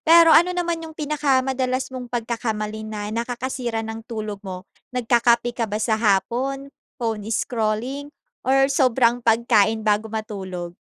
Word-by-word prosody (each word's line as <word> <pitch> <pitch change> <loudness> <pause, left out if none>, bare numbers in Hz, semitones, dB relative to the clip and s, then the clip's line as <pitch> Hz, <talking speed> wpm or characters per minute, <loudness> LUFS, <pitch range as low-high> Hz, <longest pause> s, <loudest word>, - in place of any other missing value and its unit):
Pero 330 0 +7
ano 345 +2 +7
naman 340 -1 -1
yung 320 -1 -9
pinakamadalas 265 -3 0
mong 250 -1 -6
pagkakamali 225 -3 -3
na 210 -1 -5
nakakasira 235 0 -3
ng 225 0 -6
tulog 215 -3 -5
mo, 185 -2 -7 0.3
nagkakape 240 0 +3
ka 230 -2 -2
ba 205 - -2
sa 220 0 0
hapon, 250 +7 0 0.2
phone 220 -3 -3
scrolling, 235 +5 -1 0.3
or 270 +1 +3
sobrang 245 -3 +3
pagkain 225 -2 +3
bago 215 +1 +1
matulog? 195 -5 -5
235 Hz, 135 wpm, -23 LUFS, 215-260 Hz, 0.3 s, Pero